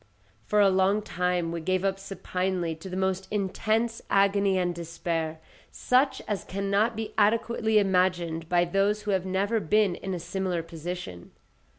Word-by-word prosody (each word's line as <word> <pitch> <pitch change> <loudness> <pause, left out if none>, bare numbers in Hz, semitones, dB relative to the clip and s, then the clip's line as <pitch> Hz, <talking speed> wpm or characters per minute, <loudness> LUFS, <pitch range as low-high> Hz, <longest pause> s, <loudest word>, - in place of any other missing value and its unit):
For 210 - +2
a 200 -1 +6
long 190 +3 +2
time 180 -3 -1
we 170 0 -4
gave 185 +3 0
up 195 0 0
supinely 185 -3 -2
to 175 +4 -9
the 185 - -4
most 190 0 -1
intense 215 +3 -1
agony 200 -1 +3
and 175 -1 0
despair, 165 -1 -3 0.3
such 260 +1 +1
as 205 -2 -2
cannot 200 +3 0
be 220 0 -5
adequately 220 +1 +2
imagined 180 -4 +1
by 175 0 +3
those 200 +4 +1
who 205 - -1
have 190 -1 0
never 200 +4 +1
been 210 +1 +2
in 190 +1 -4
a - - -4
similar 180 0 -2
position. 165 - -7
190 Hz, 160 wpm, -27 LUFS, 175-205 Hz, 0.3 s, a